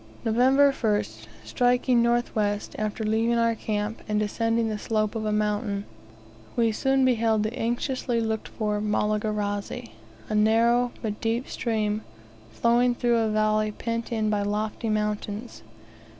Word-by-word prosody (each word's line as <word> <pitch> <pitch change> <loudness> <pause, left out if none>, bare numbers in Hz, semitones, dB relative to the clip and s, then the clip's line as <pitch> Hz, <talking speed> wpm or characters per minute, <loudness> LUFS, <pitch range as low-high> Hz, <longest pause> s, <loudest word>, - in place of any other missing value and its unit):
November 260 +5 +4
1st. 205 - -2 0.2
Striking 245 0 +2
north 240 +1 +1
west, 205 -1 -1
after 215 +1 -2
leaving 225 +2 +1
our 230 0 +3
camp, 215 0 -3
and 210 0 +1
descending 225 +2 0
the 215 -1 -3
slope 215 -1 0
of 220 -2 -3
a 215 - 0
mountain, 210 -1 -1 0.7
we 230 -2 +3
soon 270 +4 +2
beheld 225 -3 +2
the 215 +3 -3
anxiously 240 +1 -1
looked 220 -1 -2
for 210 -2 -2
Malagarazi, 210 +1 -1 0.4
a - - -4
narrow 230 +3 +3
but 210 -2 -3
deep 230 +3 -1
stream, 215 -2 -1 0.5
flowing 240 - +2
through 240 -1 +2
a 225 -1 +1
valley 215 0 +1
pent 230 +2 -4
in 215 -2 0
by 205 -1 +1
lofty 210 +2 -2
mountains. 210 - -3
220 Hz, 140 wpm, -26 LUFS, 210-235 Hz, 0.7 s, November